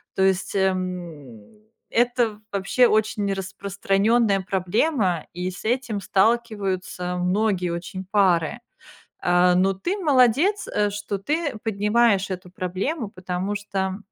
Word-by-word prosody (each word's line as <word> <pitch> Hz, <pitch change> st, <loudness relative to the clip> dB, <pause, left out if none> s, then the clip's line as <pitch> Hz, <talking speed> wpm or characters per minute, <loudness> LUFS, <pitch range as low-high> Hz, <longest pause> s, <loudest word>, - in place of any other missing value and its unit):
то 190 Hz, -, +2 dB
есть, 190 Hz, -1 st, +1 dB
эм, 180 Hz, -, -3 dB, 0.3 s
это, 240 Hz, -3 st, +1 dB
вообще, 200 Hz, +5 st, +3 dB
очень 210 Hz, -2 st, +1 dB
распространённая 200 Hz, +2 st, +1 dB
проблема, 190 Hz, -, 0 dB
и 180 Hz, +1 st, -3 dB
с 180 Hz, -, -10 dB
этим 240 Hz, -3 st, -1 dB
сталкиваются 195 Hz, -4 st, 0 dB
многие 185 Hz, 0 st, 0 dB
очень 175 Hz, +2 st, -5 dB
пары. 190 Hz, 0 st, +2 dB, 0.6 s
А, 180 Hz, 0 st, +3 dB
ну, 190 Hz, +1 st, +3 dB
ты- 350 Hz, -, -3 dB
молодец, 300 Hz, -, +3 dB
э, 210 Hz, 0 st, 0 dB
что 205 Hz, 0 st, -4 dB
ты 290 Hz, -, -2 dB
поднимаешь 210 Hz, -1 st, +2 dB
эту 180 Hz, -1 st, -6 dB
проблему, 195 Hz, -, -3 dB
потому 185 Hz, +2 st, -4 dB
что, 195 Hz, -2 st, -3 dB
195 Hz, 115 wpm, -23 LUFS, 185-225 Hz, 0.6 s, вообще